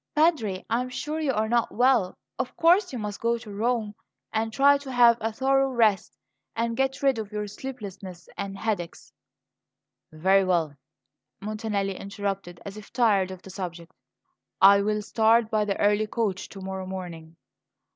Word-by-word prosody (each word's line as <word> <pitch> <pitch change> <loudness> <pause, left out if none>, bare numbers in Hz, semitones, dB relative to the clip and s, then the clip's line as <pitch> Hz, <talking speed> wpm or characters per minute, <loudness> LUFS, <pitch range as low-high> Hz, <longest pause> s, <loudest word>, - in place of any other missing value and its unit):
"Padre, 295 - +2
I 235 +2 +1
am 250 - -5
sure 300 +5 -4
you 300 -4 +1
are 220 -3 0
not 235 +1 +1
well. 245 -6 +2 0.2
Of 255 - -4
course 360 +4 +4
you 255 - -5
must 210 -2 -5
go 235 0 +1
to 220 -3 -10
Rome, 220 0 -1 0.4
and 220 0 -1
try 280 +4 +5
to 275 -2 -8
have 240 -2 +6
a 225 +1 -1
thorough 270 +3 +2
rest 220 -6 +1 0.4
and 230 0 -1
get 270 +2 -1
rid 270 -4 +3
of 215 -1 -6
your 210 0 -3
sleeplessness 200 -6 -8
and 195 0 -5
headaches." 195 -6 -4 1.0
"Very 190 +5 +3
well," 170 -6 0 0.6
Montanelli 210 -2 -2
interrupted, 195 -3 -5
as 200 +1 -7
if 210 - -12
tired 205 -6 +2
of 185 -1 -9
the 190 - -10
subject; 175 -3 -7 0.7
"I 200 +1 +7
will 210 +1 -1
start 225 +1 +3
by 215 -1 +2
the 200 -1 -1
early 210 +1 +2
coach 210 -4 -2
to 195 - -10
morrow 190 0 -5
morning." 170 -4 -7
215 Hz, 165 wpm, -26 LUFS, 195-240 Hz, 1.0 s, I